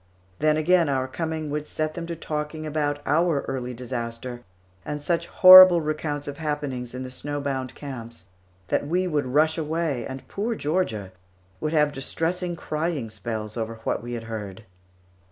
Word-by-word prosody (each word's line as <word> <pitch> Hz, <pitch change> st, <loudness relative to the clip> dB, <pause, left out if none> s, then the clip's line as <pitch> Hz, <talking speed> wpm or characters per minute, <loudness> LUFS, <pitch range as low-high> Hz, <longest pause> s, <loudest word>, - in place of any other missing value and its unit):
Then, 155 Hz, 0 st, +3 dB
again, 170 Hz, 0 st, +3 dB
our 130 Hz, -1 st, 0 dB
coming 160 Hz, +1 st, -3 dB
would 150 Hz, 0 st, -3 dB
set 155 Hz, 0 st, -2 dB
them 170 Hz, 0 st, -6 dB
to 170 Hz, -, -4 dB
talking 155 Hz, 0 st, -4 dB
about 145 Hz, -1 st, -1 dB
our 160 Hz, -2 st, +2 dB
early 125 Hz, -2 st, -4 dB
disaster 120 Hz, 0 st, -5 dB, 0.4 s
and 150 Hz, +4 st, -4 dB
such 165 Hz, +3 st, -1 dB
horrible 185 Hz, -1 st, +10 dB
recounts 150 Hz, -2 st, -3 dB
of 145 Hz, 0 st, -6 dB
happenings 145 Hz, -6 st, -3 dB
in 130 Hz, -, -4 dB
the 130 Hz, -, -7 dB
snow 145 Hz, +2 st, -4 dB
bound 135 Hz, -3 st, -3 dB
camps 115 Hz, -, -8 dB, 0.4 s
that -, -, 0 dB
we 180 Hz, +4 st, +1 dB
would 150 Hz, -6 st, 0 dB
rush 155 Hz, +5 st, +2 dB
away, 155 Hz, -4 st, -1 dB
and 130 Hz, 0 st, -8 dB
poor 225 Hz, +4 st, -2 dB
Georgia 145 Hz, -, -1 dB, 0.5 s
would 155 Hz, -, -2 dB
have 150 Hz, -2 st, +3 dB
distressing 170 Hz, +6 st, -2 dB
crying 155 Hz, -7 st, -3 dB
spells 110 Hz, 0 st, -5 dB
over 115 Hz, -1 st, -3 dB
what -, -, -1 dB
we 120 Hz, +1 st, -6 dB
had 115 Hz, -1 st, -4 dB
heard. 110 Hz, -2 st, -7 dB
145 Hz, 165 wpm, -25 LUFS, 125-160 Hz, 0.5 s, horrible